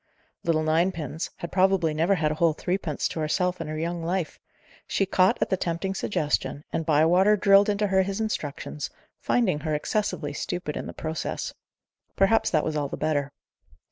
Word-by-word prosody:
"Little 160 -2 +1
ninepins" 160 -1 0
had 170 - -6
probably 185 -4 +3
never 165 +6 +2
had 155 -4 +1
a - - -2
whole 165 -2 +4
threepence 175 -2 -2
to - - -5
herself 180 +3 0
in 165 - -4
her 155 0 -4
young 170 +1 -3
life. 175 0 -2 0.5
She 195 - +1
caught 185 0 +3
at - - -6
the 190 - +2
tempting 175 +3 -2
suggestion, 150 -6 -1
and 160 - -2
Bywater 175 +7 +4
drilled 200 +1 +5
into 205 0 +1
her 190 -1 +3
his 195 +2 -2
instructions, 150 -8 -3 0.3
finding 195 -11 +1
her 155 0 -1
excessively 150 -3 -2
stupid 150 +1 -4
in - - -4
the - - -5
process. 160 0 -4 0.6
Perhaps 220 +3 +3
that 155 -6 +2
was 155 - -2
all 145 -1 0
the - - -5
better. 145 -3 0
170 Hz, 175 wpm, -26 LUFS, 155-195 Hz, 0.6 s, drilled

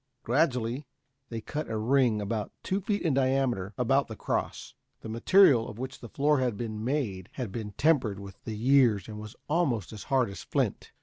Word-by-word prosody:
Gradually 125 -1 0 0.4
they 115 -1 -4
cut 150 +5 -4
a 110 - -2
ring 120 -1 +2
about 105 +1 -3
two 195 +2 -1
feet 205 +2 -1
in 160 - +2
diameter 130 -7 +1
about 135 +3 +2
the 110 - -7
cross. - - -3 0.3
The 110 - -7
material 120 - +5
of 105 - -9
which 130 +2 -6
the 120 - -10
floor 145 +3 +2
had 125 -5 0
been 110 -2 -4
made 115 -9 -2
had 125 -7 -4
been 105 -1 -5
tempered 125 -7 +2
with 100 -1 -11
the 110 -2 -5
years 120 -3 +4
and 105 -1 -7
was 105 0 -9
almost 140 - 0
as 105 - -8
hard 130 -6 +2
as 100 - -8
flint. - - -2
120 Hz, 190 wpm, -29 LUFS, 110-135 Hz, 0.4 s, material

